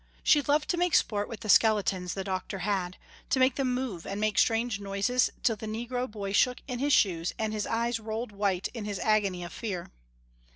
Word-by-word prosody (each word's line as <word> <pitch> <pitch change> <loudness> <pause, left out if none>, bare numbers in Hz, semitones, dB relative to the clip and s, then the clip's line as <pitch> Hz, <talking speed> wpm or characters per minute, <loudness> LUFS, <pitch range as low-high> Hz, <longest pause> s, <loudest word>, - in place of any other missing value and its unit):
She 295 - +5
loved 295 +2 +1
to 350 - -1
make 355 -1 +2
sport 205 -1 +1
with 230 - -7
the 220 - -6
skeletons 200 -4 +3
the 195 - -3
doctor 190 +1 -3
had, 185 -3 -1 0.3
to - - +2
make 260 0 +4
them 265 -1 0
move 250 -9 -3
and 200 +1 -4
make 215 -1 +1
strange 225 -2 +2
noises 200 +6 +1
till 225 -3 +2
the 220 - -7
negro 240 +3 -3
boy 205 -2 -5
shook 250 +4 +3
in 250 -3 -4
his 285 +2 +1
shoes 175 -9 +2
and 220 -1 -2
his 210 -1 -2
eyes 230 +1 0
rolled 220 +1 -4
white 200 -2 0
in 225 -4 -7
his 205 -1 -3
agony 200 -4 +1
of 175 - -8
fear. 195 -7 -5
215 Hz, 210 wpm, -28 LUFS, 195-245 Hz, 0.3 s, She